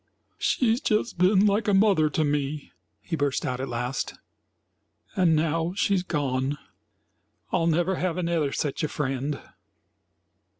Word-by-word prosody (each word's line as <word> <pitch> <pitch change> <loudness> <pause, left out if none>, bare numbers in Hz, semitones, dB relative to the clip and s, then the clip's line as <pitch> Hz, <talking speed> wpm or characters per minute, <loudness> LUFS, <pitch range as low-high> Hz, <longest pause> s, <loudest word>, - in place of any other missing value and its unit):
"She's 235 -1 +1
just 215 -3 0
been 190 +2 +5
like 205 +1 +2
a 205 - +4
mother 195 -6 +4
to 155 - 0
me," 145 0 -2 0.3
he 170 - -3
burst 145 -3 -1
out 125 0 -2
at 135 0 -3
last, 125 +2 -3 1.0
"and 175 -4 +4
now 165 +2 0
she's 200 -2 +2
gone. 140 -5 -1 0.9
I'll 170 -2 +1
never 175 +3 +1
have 185 -2 -1
another 170 -5 0
sech 145 -1 -2
a 155 - +1
friend." 135 0 -2
160 Hz, 135 wpm, -26 LUFS, 145-185 Hz, 1.0 s, been